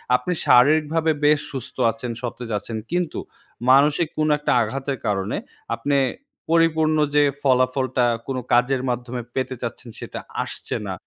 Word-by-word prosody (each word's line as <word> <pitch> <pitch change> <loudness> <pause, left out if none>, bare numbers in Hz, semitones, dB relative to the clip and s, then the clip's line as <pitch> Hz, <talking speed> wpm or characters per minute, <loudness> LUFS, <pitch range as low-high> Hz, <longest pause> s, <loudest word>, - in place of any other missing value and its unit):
আপনি 125 +8 -1
শারীরিকভাবে 155 +5 +4
বেশ 150 0 +5
সুস্থ 135 0 -6 0.2
আছেন, 115 +2 -6
সতেজ 120 -1 -5
আছেন 110 +3 -6
কিন্তু 175 -1 -1 0.5
মানসিক 145 +4 +4
কোন 155 0 +1
একটা 150 - 0
আঘাতের 135 +4 -2
কারণে 100 0 -1 0.4
আপনে 140 +4 0 0.5
পরিপূর্ণ 160 -1 +3 0.2
যে 145 - +6 0.2
ফলাফলটা 130 -1 +2 0.2
কোন 135 -1 -2 0.2
কাজের 125 +2 +3
মাধ্যমে 125 0 -3
পেতে 130 0 -2
চাচ্ছেন, 120 +1 -6
সেটা - - -6 0.2
আসছে - - -6
না। - - -3
130 Hz, 135 wpm, -22 LUFS, 125-150 Hz, 0.5 s, যে